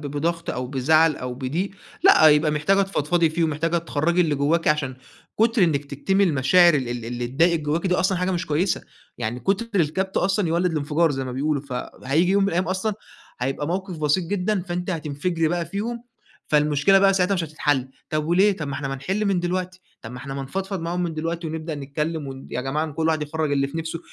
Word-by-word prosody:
بضغط 165 +4 -2
أو 125 +1 -3
بزعل 155 +4 +3
أو 125 0 -5
بضيق، 145 +10 -2 0.3
لأ، 365 - +7
يبقى 150 +1 +4
محتاجة 170 +7 +2
تفضفضي 170 -3 +1
فيه، 165 +1 0
ومحتاجة 165 +2 0
تخرجي 170 +1 0
اللي 160 -4 +2
جواكِ، 150 +4 +1
عشان 145 -4 0 0.4
كتر 225 -2 +4
إنك 145 -4 0
تكتمي 190 +8 +1
المشاعر 170 +2 +5
ال 130 -4 -1
ال 120 -1 -4
اللي 120 +1 -3
تضايقِك 165 +6 +2
جواكِ 155 +5 -1
دي 180 - +2
أصلًا 185 0 +1
حاجة 180 +1 0
مش 180 -1 -2
كويسة. 165 +6 0 0.4
يعني 120 +3 -3
كتر 200 - 0
الكبت 190 +5 -1
أصلًا 190 0 +1
يولِّد 175 +2 +1
الانفجار، 155 +2 +1
زي 135 -2 -2
ما 130 - -5
بيقولوا، 140 +2 -1
فهييجي 140 +5 -1
يوم 200 0 +3
من 195 - +2
الأيام 180 0 0
أصلًا، 190 +3 -1 0.5
هيبقى 135 +3 -2
موقف 185 +1 -3
بسيط 155 +4 +1
جدًا، 195 +1 -1
فأنتِ 180 0 -4
هتنفجري 160 +1 -1
بقى 170 0 -1
فيهم، 225 +7 -4 0.5
فالمشكلة 150 +5 +4
بقى 195 0 +4
ساعتها 190 +1 +2
مش 175 -3 -1
هتتحل. 145 -4 -1 0.2
طب 155 -1 -1
وليه؟ 190 +5 +4
طب 150 -4 -5
ما 140 - -4
إحنا 140 -2 -4
ما 135 - -3
نحل 190 +10 -2
من 195 -3 +1
دلوقتي، 185 +1 -3 0.2
طب 115 - -8
ما 125 - -7
إحنا 135 +1 -7
ما 135 - -4
نفضفض 190 +6 -4
معاهم 170 +2 -2
من 170 -2 -2
دلوقتي، 165 +2 -3
ونبدأ 160 0 -4
نتكلم، 150 +2 -3
ون 135 0 -9
يا 125 - -2
جماعة، 150 +4 -2
كل 160 +2 -1
واحد 155 -1 +1
يخرّج 150 0 -2
اللي 140 -1 +2
في 140 +4 -6
نفسه. 165 +1 -4
160 Hz, 210 wpm, -23 LUFS, 145-180 Hz, 0.5 s, لأ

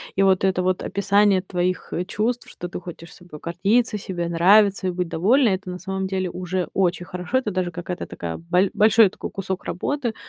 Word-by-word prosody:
И 195 - +3
вот 190 0 +3
это 185 -1 +1
вот 185 0 0
описание 200 -1 +2
твоих 180 -1 -2 0.2
чувств, 230 +5 -2
что 175 - -7
ты - - -6
хочешь 170 -1 -10
собой 175 -4 -12
гордиться, 205 +7 +1
себе 175 -3 -4
нравиться 195 +3 +4
и - - 0
быть 180 -1 -3
довольна- 230 - +3
это 190 -1 -2
на 180 0 -6
самом 190 0 -3
деле 185 -1 -2
уже 180 +1 -3
очень 180 -2 0
хорошо. 180 +7 -2
Это 215 -5 -3
даже 180 -1 -1
какая-то 175 +1 -5
такая 85 -1 -6
боль 180 +3 +1
большой 215 -1 +5
такой - - -8
кусок 190 -1 -4
работы. 245 +4 -2
185 Hz, 195 wpm, -23 LUFS, 180-200 Hz, 0.2 s, большой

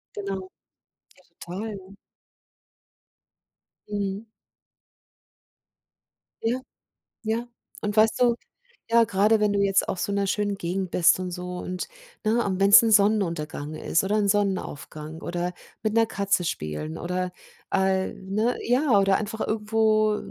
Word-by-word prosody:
Genau. 195 -2 -4 1.0
Toll. 195 +1 -7 1.9
Mhm. 200 +1 -3 2.2
Ja. 240 +3 +1 0.6
Ja. 230 +2 -1 0.3
Und 210 0 -3
weißt 220 +3 +4
du, 240 -1 +5 0.6
ja, 230 0 +6
gerade 210 +2 +3
wenn 210 -1 +2
du 200 - +1
jetzt 195 -1 +2
auf 180 - -2
so - - -1
'ner 200 0 +1
schönen 205 0 0
Gegend 185 0 -3
bist 180 +1 +4
und 185 -1 -3
so 180 0 -5
und 180 0 -4 0.4
ne, 230 +2 +2
und 190 -2 -1
wenn's 200 +5 +8
'n 225 - +2
Sonnenuntergang 170 -8 +1
ist 165 - 0
oder 200 +2 0
'n 210 -1 +2
Sonnenaufgang 165 -6 -2
oder 175 +1 -2 0.3
mit 215 0 0
'ner 225 0 +4
Katze 200 -3 0
spielen 75 - -4
oder, 180 +1 -2 0.4
äh, 190 -1 +1
ne, 210 +6 -1
ja 245 -2 +3
oder 195 -1 +4
einfach 220 +1 -4
irgendwo 215 0 +2
200 Hz, 125 wpm, -25 LUFS, 185-215 Hz, 2.2 s, wenn's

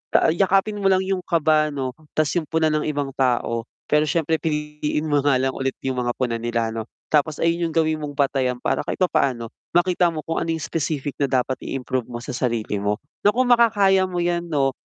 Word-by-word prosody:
Ah, - - +5
yakapin 195 +4 +2
mo 195 - +1
lang 190 0 +3
yung 190 -1 -1
kaba 155 -2 +2
'no 130 -2 -3 0.2
'tas 155 -2 +2
yung 155 - -8
puna 160 -1 +1
ng 155 0 0
ibang 145 -2 -2
tao. 120 -3 0 0.2
Pero 150 0 +3
syempre 160 +1 +1
piliin 150 -1 -2
mo 145 -1 +2
nga 140 -1 +3
lang 130 +1 +1
ulit 135 0 -3
yung 130 -1 -1
mga 120 0 0
puna 125 -3 -1
nila 115 -1 -1
'no. 110 0 -4 0.3
Tapos 150 0 +2
ayun 170 0 +1
yung 160 - -7
gawin 160 -1 +2
mong 145 -1 -6
batayan 135 -3 +1
para - - +1
kahit - - -2
papaano, 130 -9 +1 0.3
makita 175 0 +3
mo 155 - -5
kung 165 - -2
ano 165 - -4
yung 160 - -5
specific 145 -3 -2
na 140 - +2
dapat 130 0 +1
i-improve 130 -2 -2
mo 120 -1 -6
sa 135 - -5
sarili 115 -5 -1
mo. 105 +1 0 0.3
Nako 245 +5 +4
kung - - -2
makakaya 200 -5 +5
mo 180 -1 -3
yan 175 0 0
'no. 140 -4 +1
150 Hz, 215 wpm, -22 LUFS, 130-165 Hz, 0.3 s, Ah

